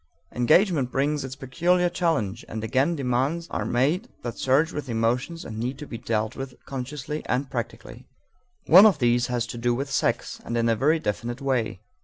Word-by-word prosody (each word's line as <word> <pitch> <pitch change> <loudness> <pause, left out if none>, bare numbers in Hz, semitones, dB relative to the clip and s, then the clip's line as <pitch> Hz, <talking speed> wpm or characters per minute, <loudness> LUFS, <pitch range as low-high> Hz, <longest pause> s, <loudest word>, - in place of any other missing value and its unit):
Engagement 150 - +3
brings 145 +2 0
its 130 0 -6
peculiar 170 +7 +1
challenge, 160 - -1
and 110 0 -5
again 135 +9 +1
demands 140 +5 -1
are - - -2
made 155 - +1
that 120 -2 -4
surge 140 +5 +2
with 145 -3 -5
emotions 120 +8 -1
and 110 -1 -6
need 125 +3 -3
to 150 - -7
be 115 -5 -7
dealt 110 -2 -1
with 135 -1 -6
consciously 140 +3 -5
and 130 +2 -1
practically. 120 -3 -6 0.6
One 190 +6 +9
of 200 - +3
these 120 -1 +2
has 120 -2 -1
to 120 0 -7
do 120 0 +1
with 135 +2 -4
sex, - - -1
and 120 - -3
in 115 0 +2
a 115 - +3
very 150 +8 +3
definite 120 -2 -3
way. 125 -8 -1
130 Hz, 185 wpm, -25 LUFS, 120-150 Hz, 0.6 s, One